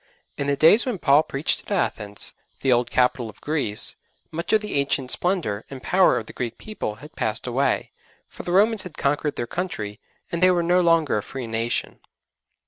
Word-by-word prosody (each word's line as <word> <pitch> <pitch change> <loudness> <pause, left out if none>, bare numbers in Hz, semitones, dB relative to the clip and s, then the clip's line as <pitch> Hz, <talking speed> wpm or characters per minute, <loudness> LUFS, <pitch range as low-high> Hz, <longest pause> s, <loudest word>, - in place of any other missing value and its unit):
In 140 - -3
the 140 - +2
days 165 - +6
when 250 -6 -2
Paul 145 -3 +5
preached 145 -1 0
at - - -13
Athens, 105 - -2 0.3
the 135 - +2
old 120 0 +3
capital 125 -2 +1
of - - -14
Greece, 145 -9 +1 0.3
much 170 +2 -3
of 220 - +5
the 210 - -5
ancient 140 -2 0
splendour 170 - 0
and 135 -2 -9
power 185 0 +4
of 110 - -4
the - - -11
Greek 120 -2 -4
people 210 - -5
had 150 +7 -14
passed 110 0 -1
away, 130 +3 0 0.4
for - - -10
the 175 - -4
Romans 210 +3 +4
had 185 -6 -9
conquered 145 +1 0
their 120 - -2
country, 115 - -4 0.3
and 170 - -2
they 185 - +7
were 175 -2 +2
no 180 +2 +3
longer 165 -9 +3
a - - -4
free 130 +4 -6
nation. 115 +1 -2
140 Hz, 200 wpm, -24 LUFS, 120-180 Hz, 0.4 s, they